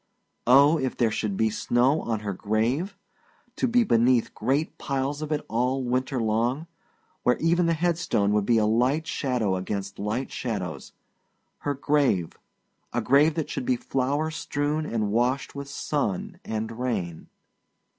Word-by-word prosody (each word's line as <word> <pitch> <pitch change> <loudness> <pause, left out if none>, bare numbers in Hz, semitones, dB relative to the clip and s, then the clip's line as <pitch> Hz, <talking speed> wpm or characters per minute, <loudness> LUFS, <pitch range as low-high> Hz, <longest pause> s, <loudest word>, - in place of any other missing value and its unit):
Oh, 140 +5 +6
if 130 -2 -2
there 115 -3 +2
should 105 -2 -2
be 110 -1 +2
snow 125 +7 +2
on 110 -2 -2
her 100 -2 -3
grave! 115 - -1 0.6
To - - +1
be 240 0 +4
beneath 120 - +3
great 135 +7 -1
piles 140 +1 -2
of 155 0 -4
it 150 -1 -1
all 125 +3 0
winter 130 +1 -1
long, 115 +7 0 0.6
where 125 - +2
even 170 +1 +2
her 165 - +3
headstone 160 - +1
would 105 -1 +1
be 120 - +4
a 110 - +3
light 125 +8 +2
shadow 125 - 0
against 100 +1 -4
light 110 +6 -2
shadows. 105 -7 -4 0.7
Her 145 -1 -2
grave 135 - +1 0.6
a - - 0
grave 150 +4 +4
that 160 -3 -3
should - - -3
be 130 - +3
flower 140 +5 -1
strewn 150 0 -2
and 110 -3 -1
washed 125 +5 0
with 140 0 -6
sun 180 +8 -2
and 110 +1 -4
rain. 90 -10 -3
130 Hz, 155 wpm, -26 LUFS, 110-150 Hz, 0.7 s, Oh